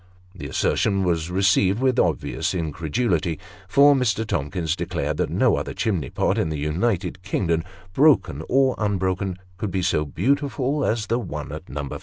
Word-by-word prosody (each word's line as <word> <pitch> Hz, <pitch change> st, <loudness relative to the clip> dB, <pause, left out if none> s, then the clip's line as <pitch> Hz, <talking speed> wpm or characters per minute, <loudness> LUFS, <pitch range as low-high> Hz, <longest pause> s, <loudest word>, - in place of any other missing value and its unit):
The 75 Hz, -8 st, -7 dB
assertion 95 Hz, +7 st, +1 dB
was 85 Hz, -2 st, 0 dB
received 95 Hz, +2 st, +2 dB
with 130 Hz, -1 st, +2 dB
obvious 80 Hz, +3 st, 0 dB
incredulity, 80 Hz, +1 st, -1 dB, 0.3 s
for 140 Hz, +8 st, +6 dB
Mr. 115 Hz, -5 st, +1 dB
Tom 75 Hz, -9 st, -2 dB
kins 85 Hz, -2 st, -1 dB
declared -, -, -3 dB
that -, -, 0 dB
no -, -, +2 dB
other -, -, -4 dB
chimney 95 Hz, -9 st, -1 dB
pot -, -, 0 dB
in -, -, 0 dB
the 80 Hz, -, -3 dB
United 90 Hz, +5 st, -1 dB
Kingdom, 85 Hz, -3 st, 0 dB, 0.3 s
broken 150 Hz, +6 st, +3 dB
or 135 Hz, 0 st, +3 dB
unbroken, 95 Hz, -2 st, -1 dB, 0.2 s
could 105 Hz, -, -3 dB
be 95 Hz, 0 st, -2 dB
so 85 Hz, -3 st, +1 dB
beautiful 140 Hz, -, 0 dB
as 110 Hz, -1 st, 0 dB
the 115 Hz, +4 st, 0 dB
one 75 Hz, -, -6 dB
at -, -, -8 dB
No. 75 Hz, 0 st, -4 dB
95 Hz, 165 wpm, -23 LUFS, 80-115 Hz, 0.3 s, for